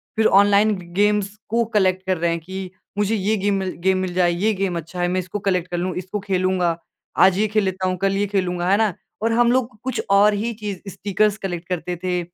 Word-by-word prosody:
फिर 220 Hz, 0 st, +2 dB, 0.2 s
ऑनलाइन 205 Hz, +1 st, +3 dB
ग 185 Hz, -, -9 dB
गेम्स 205 Hz, 0 st, +2 dB
को 235 Hz, +1 st, +2 dB
कलेक्ट 185 Hz, -1 st, +2 dB
कर 185 Hz, -2 st, 0 dB
रहे 170 Hz, +1 st, 0 dB
हैं 170 Hz, -, -1 dB
कि, 185 Hz, +2 st, -7 dB, 0.3 s
"मुझे 210 Hz, +2 st, +1 dB
ये 210 Hz, +1 st, +1 dB
गेम 200 Hz, +1 st, +1 dB
मिल 190 Hz, -1 st, -2 dB
गेम 190 Hz, 0 st, +3 dB
मिल 185 Hz, -1 st, -2 dB
जाए, 175 Hz, -1 st, +3 dB
ये 205 Hz, +6 st, +1 dB
गेम 190 Hz, -3 st, -1 dB
अच्छा 170 Hz, +2 st, -6 dB
है। 175 Hz, -, +2 dB
मैं 185 Hz, +1 st, 0 dB
इसको 185 Hz, +3 st, -4 dB
कलेक्ट 180 Hz, -2 st, +1 dB
कर 175 Hz, -, -1 dB
लूँ, 180 Hz, +1 st, -2 dB
इसको 185 Hz, +3 st, -4 dB
खेलूँगा। 185 Hz, -3 st, 0 dB, 0.5 s
आज 190 Hz, 0 st, +4 dB
ये 215 Hz, +1 st, +2 dB
खेल 215 Hz, 0 st, +1 dB
लेता 190 Hz, -1 st, -1 dB
हूँ, 185 Hz, 0 st, -1 dB
कल 195 Hz, +1 st, 0 dB
ये 205 Hz, -, +1 dB
खेलूँगा।" 180 Hz, -3 st, -1 dB
है 200 Hz, -, +5 dB
ना? 215 Hz, -4 st, +2 dB, 0.3 s
और 225 Hz, +1 st, +1 dB
हम 240 Hz, +1 st, +4 dB
लोग 255 Hz, -2 st, +2 dB
को 215 Hz, -, -23 dB
कुछ 260 Hz, 0 st, -2 dB
और 205 Hz, +1 st, +5 dB
ही 225 Hz, +3 st, -2 dB
चीज़ 205 Hz, -4 st, -6 dB
स्टिकर्स 205 Hz, +2 st, 0 dB
कलेक्ट 175 Hz, -3 st, -5 dB
करते 180 Hz, 0 st, -3 dB
थे, 180 Hz, -1 st, 0 dB
190 Hz, 245 wpm, -21 LUFS, 180-210 Hz, 0.5 s, है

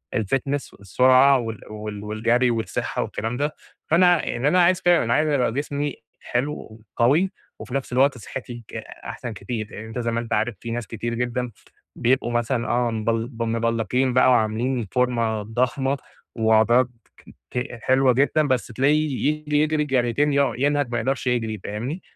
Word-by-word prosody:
الfitness 135 Hz, +5 st, -1 dB
والسرعة 130 Hz, +7 st, +4 dB
وال 115 Hz, -2 st, -5 dB
وال 105 Hz, -1 st, -6 dB
والجري 115 Hz, +4 st, +1 dB
والصحة 115 Hz, -1 st, -2 dB
والكلام 115 Hz, +3 st, -4 dB
ده، 145 Hz, +2 st, -1 dB, 0.3 s
فأنا 175 Hz, 0 st, +4 dB
يعني 125 Hz, +4 st, -1 dB
أنا 180 Hz, +4 st, +4 dB
عايز 180 Hz, +1 st, +3 dB
كده 175 Hz, -4 st, +4 dB
أنا 115 Hz, -, +1 dB
عايز 155 Hz, +3 st, +2 dB
ابقى 130 Hz, -5 st, +2 dB
جسمي 145 Hz, 0 st, -2 dB, 0.3 s
حلو 120 Hz, -3 st, -3 dB, 0.2 s
وقوي 140 Hz, +10 st, +4 dB, 0.4 s
و -, -, -6 dB
وفي 125 Hz, -, -10 dB
نفس 135 Hz, -2 st, -3 dB
الوقت 135 Hz, +1 st, +3 dB
صحتي 120 Hz, +1 st, -8 dB
ك -, -, -12 dB, 0.3 s
أحسن 120 Hz, -3 st, -6 dB
كتير، 110 Hz, +2 st, -5 dB
أ 110 Hz, -, -7 dB
أنت 115 Hz, +2 st, -5 dB
زي 115 Hz, -1 st, -1 dB
ما 115 Hz, -, 0 dB
أنت 115 Hz, -1 st, -4 dB
عارف 110 Hz, +1 st, 0 dB
في 115 Hz, -, -6 dB
ناس 115 Hz, -3 st, -4 dB
كتير 115 Hz, +1 st, -4 dB
جدًا 125 Hz, 0 st, -2 dB, 0.4 s
بيبقوا 120 Hz, -1 st, +1 dB
مثلًا 120 Hz, 0 st, 0 dB
آه، 120 Hz, 0 st, +1 dB
مبل 115 Hz, +1 st, -1 dB
ب 115 Hz, -3 st, -5 dB
مبلقين 115 Hz, +2 st, 0 dB
بقى 125 Hz, +1 st, +5 dB
وعاملين 115 Hz, +1 st, +1 dB
فورمة 115 Hz, -4 st, +1 dB
ضخمة 130 Hz, +5 st, 0 dB, 0.4 s
وعضلات 115 Hz, +2 st, +4 dB, 0.6 s
ك -, -, -5 dB
ت 125 Hz, -, -3 dB, 0.2 s
حلوة 130 Hz, 0 st, +4 dB
جدًا 145 Hz, +4 st, +2 dB
بس 130 Hz, -3 st, 0 dB
تلاقيه 140 Hz, +3 st, +1 dB
يجري 150 Hz, -1 st, 0 dB
يجري 155 Hz, 0 st, +1 dB
جريتين 135 Hz, +2 st, +1 dB
يقعُ 140 Hz, -1 st, +2 dB
ينهج 145 Hz, -1 st, +1 dB
ما 120 Hz, -, 0 dB
يقدرش 130 Hz, +2 st, -2 dB
يجري، 115 Hz, -4 st, -1 dB
فاهمني؟ 125 Hz, -, -4 dB
125 Hz, 170 wpm, -23 LUFS, 115-140 Hz, 0.6 s, بقى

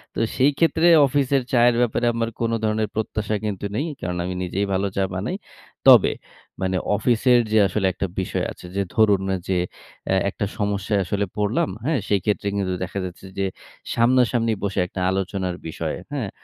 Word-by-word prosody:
তো -, -, -2 dB, 0.2 s
সেইক্ষেত্রে 160 Hz, +5 st, +3 dB, 0.2 s
অফিসের 140 Hz, 0 st, +1 dB
চায়ের 120 Hz, 0 st, +5 dB
ব্যাপারে 120 Hz, 0 st, +1 dB
আমার 115 Hz, 0 st, -1 dB
কোন 115 Hz, 0 st, 0 dB
ধরনের 110 Hz, 0 st, +1 dB
প্রত্যাশা 110 Hz, -1 st, -2 dB
কিন্তু 100 Hz, -2 st, -3 dB
নেই। 145 Hz, +8 st, 0 dB
এই -, -, -9 dB
কারণ 90 Hz, 0 st, -3 dB
আমি 90 Hz, +1 st, -3 dB
নিজেই 95 Hz, +3 st, -1 dB
ভালো 95 Hz, +1 st, +1 dB
চা 95 Hz, -, +2 dB
বানাই। 105 Hz, -, -2 dB, 0.5 s
তবে -, -, +8 dB, 0.5 s
মানে 95 Hz, 0 st, 0 dB, 0.2 s
অফিসের 120 Hz, +3 st, +3 dB
যে 110 Hz, -, +4 dB
আসলে 100 Hz, -1 st, -1 dB
একটা 95 Hz, -, -2 dB
বিষয় 95 Hz, -, -2 dB
আছে -, -, -12 dB
যে 100 Hz, -, +1 dB
ধরুন 105 Hz, -3 st, +4 dB, 0.3 s
যে, 95 Hz, -, +1 dB, 0.5 s
অ্যা 95 Hz, -, +2 dB
একটা 100 Hz, -, -3 dB
সমস্যায় 100 Hz, 0 st, 0 dB
আসলে 100 Hz, +2 st, -1 dB
পড়লাম, 105 Hz, -1 st, +1 dB, 0.2 s
হ্যাঁ? 155 Hz, -3 st, +1 dB
সেইক্ষেত্রে 100 Hz, 0 st, 0 dB
কিন্তু 95 Hz, -2 st, -1 dB
দেখা 95 Hz, +2 st, -4 dB
যাচ্ছে 90 Hz, +1 st, -9 dB
যে 100 Hz, -, +1 dB, 0.5 s
সামনাসামনি 120 Hz, -1 st, +3 dB
বসে 100 Hz, -1 st, -1 dB
একটা 95 Hz, -, -7 dB
আলোচনার 95 Hz, -1 st, -2 dB
বিষয়, 80 Hz, 0 st, -3 dB, 0.2 s
হ্যাঁ? 125 Hz, -8 st, -2 dB
105 Hz, 170 wpm, -23 LUFS, 95-120 Hz, 0.5 s, তবে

